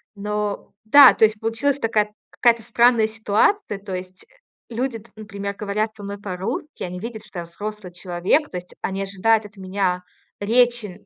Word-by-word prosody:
Но 210 Hz, 0 st, -3 dB
да, 275 Hz, +4 st, +9 dB
то 220 Hz, -, +5 dB
есть 215 Hz, 0 st, -1 dB
получилась 235 Hz, +6 st, 0 dB
такая 215 Hz, -3 st, +1 dB, 0.2 s
какая-то 235 Hz, -1 st, +3 dB
странная 235 Hz, 0 st, +4 dB
ситуация. 220 Hz, -, +1 dB
То 195 Hz, -2 st, -6 dB
есть, 185 Hz, 0 st, -9 dB
э, -, -, -18 dB
люди, 250 Hz, -1 st, -2 dB
т 225 Hz, -, -19 dB
например, 200 Hz, -2 st, -6 dB
говорят 210 Hz, +2 st, -2 dB
со 205 Hz, -, -10 dB
мной 200 Hz, 0 st, -6 dB
по-русски. 200 Hz, -, -5 dB
Они 180 Hz, 0 st, -5 dB
видят, 220 Hz, 0 st, -7 dB
что 190 Hz, -4 st, -8 dB
я 170 Hz, -, -5 dB
взрослый 205 Hz, +2 st, -7 dB
человек. 180 Hz, -, 0 dB
То 180 Hz, -, -4 dB
есть 180 Hz, 0 st, -10 dB
они 195 Hz, 0 st, -2 dB
ожидают 210 Hz, +3 st, +1 dB
от 205 Hz, 0 st, -24 dB
меня 185 Hz, -1 st, -1 dB, 0.4 s
речи 225 Hz, -3 st, +1 dB
210 Hz, 175 wpm, -22 LUFS, 195-225 Hz, 0.4 s, да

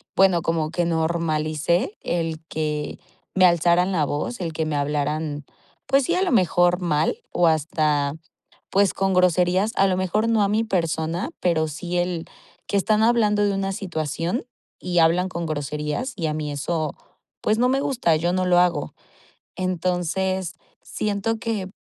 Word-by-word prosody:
bueno, 190 Hz, -3 st, +4 dB
como 160 Hz, -1 st, -1 dB
que 175 Hz, 0 st, 0 dB
normalicé 160 Hz, -, 0 dB
el 165 Hz, -2 st, -2 dB
que 150 Hz, -1 st, -3 dB, 0.4 s
me 185 Hz, -1 st, +6 dB
alzaran 175 Hz, +2 st, +3 dB
la 160 Hz, -5 st, +1 dB
voz, 150 Hz, -, -3 dB
el 165 Hz, -2 st, -3 dB
que 160 Hz, 0 st, -1 dB
me 155 Hz, -1 st, -2 dB
hablaran, 145 Hz, +1 st, -2 dB, 0.4 s
pues, 275 Hz, +1 st, +3 dB
sí, 345 Hz, -, +1 dB
a 370 Hz, -, +2 dB
lo 365 Hz, -, 0 dB
mejor 180 Hz, -3 st, +3 dB
mal 155 Hz, -2 st, +1 dB
o 175 Hz, -, +2 dB
hasta, 150 Hz, -2 st, +1 dB, 0.6 s
pues, 195 Hz, 0 st, +3 dB
con 195 Hz, 0 st, 0 dB
groserías, 180 Hz, +3 st, +3 dB
a 195 Hz, -, +4 dB
lo 185 Hz, -, +1 dB
mejor, 210 Hz, +5 st, 0 dB
no 220 Hz, -2 st, +3 dB
a -, -, +1 dB
mi 215 Hz, +2 st, +1 dB
persona, 170 Hz, -, -1 dB
pero 160 Hz, -3 st, +1 dB
sí 175 Hz, +4 st, -4 dB
el 175 Hz, -2 st, -1 dB, 0.4 s
que 200 Hz, -, 0 dB
están 215 Hz, +2 st, +2 dB
hablando 215 Hz, -3 st, +3 dB
de 200 Hz, -, +2 dB
una 195 Hz, 0 st, -1 dB
situación 175 Hz, -, -3 dB, 0.3 s
y 180 Hz, -1 st, -1 dB
hablan 175 Hz, +3 st, +3 dB
con 170 Hz, -2 st, -4 dB
groserías 150 Hz, -, -3 dB
y 165 Hz, -4 st, -2 dB
a 150 Hz, -, -1 dB
mí 150 Hz, -1 st, -3 dB
eso, 155 Hz, +2 st, -2 dB, 0.5 s
pues, 215 Hz, +1 st, +1 dB
no 250 Hz, +1 st, +3 dB
me 270 Hz, +1 st, +2 dB
gusta, 235 Hz, -, +1 dB
yo 170 Hz, +3 st, 0 dB
no 185 Hz, 0 st, 0 dB
lo 175 Hz, 0 st, +5 dB
hago. 170 Hz, -5 st, 0 dB, 0.6 s
Entonces, 185 Hz, 0 st, -1 dB, 0.3 s
siento 215 Hz, +2 st, -2 dB
que, 215 Hz, -5 st, -3 dB
175 Hz, 165 wpm, -23 LUFS, 160-195 Hz, 0.6 s, me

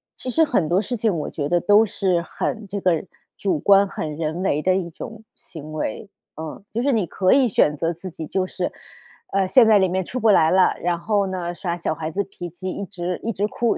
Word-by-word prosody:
其 255 Hz, -, -5 dB
实 320 Hz, +6 st, +3 dB
很 190 Hz, -, 0 dB
多 180 Hz, +4 st, +3 dB
事 245 Hz, -, -3 dB
情 220 Hz, -2 st, +1 dB
我 150 Hz, -, -4 dB
觉 145 Hz, -1 st, -3 dB
得 175 Hz, -, +3 dB
都 205 Hz, +4 st, +5 dB
是 185 Hz, -3 st, 0 dB
很 215 Hz, +5 st, -4 dB
这 200 Hz, +1 st, -4 dB
个， 175 Hz, -2 st, +1 dB, 0.3 s
主 185 Hz, -6 st, 0 dB
观 200 Hz, +4 st, +5 dB
很 155 Hz, -5 st, -5 dB
人 160 Hz, +3 st, -3 dB
为 150 Hz, -5 st, +1 dB
的 185 Hz, +2 st, +2 dB
一 185 Hz, -3 st, -2 dB
种 220 Hz, +6 st, -9 dB
行 155 Hz, -3 st, -10 dB
为， 155 Hz, -, -4 dB, 0.3 s
嗯。 160 Hz, +5 st, -7 dB
就 235 Hz, -, 0 dB
是 275 Hz, 0 st, +2 dB
你 210 Hz, -5 st, +1 dB
可 185 Hz, +2 st, +2 dB
以 270 Hz, -1 st, +5 dB
选 150 Hz, -8 st, +2 dB
择 165 Hz, +3 st, 0 dB
自 180 Hz, +3 st, -7 dB
己 165 Hz, -1 st, -7 dB
就 185 Hz, +4 st, -1 dB
是， 185 Hz, -1 st, -3 dB, 0.6 s
呃， 195 Hz, -1 st, +2 dB
陷 230 Hz, +3 st, +6 dB
在 215 Hz, -, +6 dB
里 190 Hz, -, +3 dB
面 185 Hz, 0 st, -1 dB
出 255 Hz, -, -5 dB
不 225 Hz, -2 st, +3 dB
来 160 Hz, -5 st, +5 dB
了， 185 Hz, 0 st, +4 dB
然 175 Hz, 0 st, 0 dB
后 205 Hz, +1 st, +1 dB
呢， 180 Hz, -2 st, -3 dB
耍 170 Hz, -1 st, -3 dB
小 170 Hz, -2 st, -1 dB
孩 155 Hz, 0 st, -4 dB
子 200 Hz, +5 st, -1 dB
脾 175 Hz, -3 st, -8 dB
气， 185 Hz, +3 st, -6 dB
一 200 Hz, -, -5 dB
直 180 Hz, -2 st, -4 dB
一 230 Hz, -, -2 dB
直 200 Hz, +2 st, 0 dB
哭、 235 Hz, +2 st, 0 dB
185 Hz, 255 characters per minute, -22 LUFS, 170-205 Hz, 0.6 s, 陷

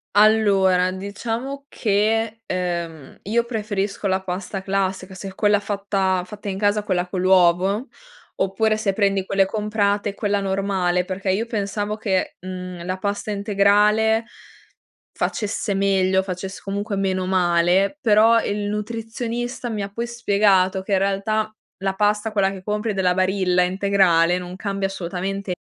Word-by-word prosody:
Allora, 200 Hz, -4 st, +4 dB
diciamo 230 Hz, +8 st, -5 dB
che, 220 Hz, +1 st, 0 dB
ehm, 170 Hz, -5 st, -4 dB
io 230 Hz, +4 st, +1 dB
preferisco 205 Hz, -3 st, -2 dB
la 190 Hz, 0 st, 0 dB
pasta 190 Hz, +1 st, -4 dB
classica 190 Hz, -1 st, -2 dB
se 190 Hz, +1 st, -7 dB
è 190 Hz, -, -9 dB
quella 205 Hz, 0 st, +3 dB
fatta 195 Hz, -2 st, -1 dB
fatta 205 Hz, +2 st, -7 dB
in 190 Hz, -, -3 dB
casa, 205 Hz, +1 st, +2 dB
quella 185 Hz, -3 st, 0 dB
con 180 Hz, 0 st, -3 dB
l'uovo, 185 Hz, +5 st, +3 dB, 0.5 s
oppure 215 Hz, +3 st, +1 dB
se 210 Hz, -3 st, 0 dB
prendi 195 Hz, -1 st, +1 dB
quelle 195 Hz, 0 st, +2 dB
comprate, 205 Hz, 0 st, -1 dB
quella 205 Hz, -1 st, 0 dB
normale, 190 Hz, -2 st, 0 dB
perché 190 Hz, +1 st, -3 dB
io 200 Hz, +5 st, +1 dB
pensavo 210 Hz, -2 st, -2 dB
che, 195 Hz, -4 st, -1 dB
mhmm, 180 Hz, -1 st, -7 dB
la 185 Hz, +1 st, -2 dB
pasta 200 Hz, +2 st, -3 dB
integrale 210 Hz, +2 st, +3 dB, 0.9 s
facesse 210 Hz, -1 st, -2 dB
meglio, 190 Hz, -1 st, +2 dB
facesse 190 Hz, 0 st, -6 dB
comunque 200 Hz, +2 st, -3 dB
meno 190 Hz, -1 st, 0 dB
male, 185 Hz, -, +2 dB
però 225 Hz, -1 st, +5 dB
il 205 Hz, 0 st, -2 dB
nutrizionista 230 Hz, +3 st, -4 dB
mi 215 Hz, -2 st, -3 dB
ha 200 Hz, -, -5 dB
poi 235 Hz, +3 st, -3 dB
spiegato 200 Hz, -5 st, +2 dB
che 195 Hz, -, -5 dB
in 195 Hz, -, +4 dB
realtà 200 Hz, +3 st, 0 dB, 0.3 s
la 195 Hz, 0 st, -1 dB
pasta 210 Hz, +2 st, +1 dB
quella 195 Hz, -2 st, +2 dB
che 190 Hz, -1 st, -9 dB
compri 210 Hz, +1 st, -2 dB
della 185 Hz, -2 st, +2 dB
Barilla 185 Hz, -1 st, +2 dB
integrale 180 Hz, -2 st, +3 dB
non 180 Hz, 0 st, -7 dB
cambia 195 Hz, 0 st, -2 dB
assolutamente 195 Hz, +1 st, -4 dB
195 Hz, 145 wpm, -22 LUFS, 185-210 Hz, 0.9 s, però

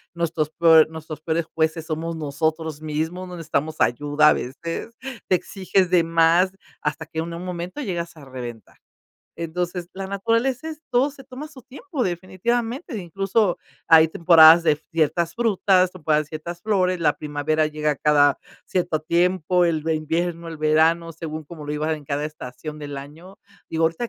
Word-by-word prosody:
nuestros 165 Hz, -2 st, -1 dB
probl 160 Hz, -1 st, +6 dB
nuestros 155 Hz, -1 st, -8 dB
peores 160 Hz, +1 st, -1 dB
jueces 160 Hz, 0 st, 0 dB
somos 165 Hz, +1 st, -3 dB
nosotros 155 Hz, +1 st, -2 dB
mismos, 160 Hz, +4 st, -3 dB
no 180 Hz, -, -8 dB
necesitamos 155 Hz, -1 st, -2 dB
ayuda 145 Hz, +4 st, +3 dB
a -, -, +5 dB
veces, 165 Hz, -, -5 dB, 0.3 s
te 185 Hz, -, +4 dB
exiges 190 Hz, 0 st, 0 dB
de 175 Hz, -2 st, +5 dB
más, 165 Hz, +3 st, +3 dB, 0.3 s
hasta 160 Hz, -, -3 dB
que 160 Hz, 0 st, -5 dB
en 165 Hz, +1 st, -3 dB
un 170 Hz, +2 st, -6 dB
momento 180 Hz, +7 st, -5 dB
llegas 170 Hz, -, -4 dB
a 145 Hz, -, -12 dB
reventar. 120 Hz, -4 st, -9 dB, 0.6 s
Entonces, 175 Hz, +1 st, -3 dB
la 195 Hz, 0 st, -5 dB
naturaleza 230 Hz, +9 st, 0 dB
es, 310 Hz, -1 st, -8 dB
todo 255 Hz, +3 st, +3 dB
se 270 Hz, -1 st, -14 dB
toma 265 Hz, +4 st, -8 dB
su 270 Hz, -5 st, -14 dB
tiempo 285 Hz, +3 st, -5 dB
definitivamente, 230 Hz, -, -2 dB
incluso, 195 Hz, +2 st, 0 dB, 0.3 s
hay 160 Hz, -1 st, +8 dB
temporadas 165 Hz, 0 st, +7 dB
de 155 Hz, -2 st, +4 dB, 0.2 s
ciertas 165 Hz, +1 st, +1 dB
frutas, 195 Hz, -5 st, +2 dB
temporadas 155 Hz, -4 st, 0 dB
de -, -, -26 dB
ciertas 170 Hz, +2 st, -6 dB
flores, 185 Hz, -4 st, +1 dB
la 150 Hz, -3 st, +2 dB
primavera 150 Hz, +1 st, 0 dB
llega 150 Hz, -1 st, -1 dB
cada 145 Hz, -1 st, +4 dB, 0.3 s
cierto 175 Hz, -4 st, -1 dB
tiempo, 180 Hz, +2 st, +2 dB
el 165 Hz, -3 st, 0 dB
el 160 Hz, -, +2 dB
invierno, 165 Hz, +2 st, -2 dB
el 160 Hz, -, -8 dB
verano, 160 Hz, +2 st, +2 dB
según 155 Hz, -1 st, -6 dB
cómo 155 Hz, 0 st, -10 dB
lo 145 Hz, -, -3 dB
iban 155 Hz, +1 st, -1 dB
en 150 Hz, -, -13 dB
cada 145 Hz, +2 st, -2 dB
estación 150 Hz, +1 st, -8 dB
del 145 Hz, -2 st, -6 dB
año. 160 Hz, +7 st, -12 dB, 0.3 s
Digo, 160 Hz, 0 st, +1 dB
ahorita 165 Hz, +9 st, -1 dB
165 Hz, 165 wpm, -23 LUFS, 155-185 Hz, 0.6 s, hay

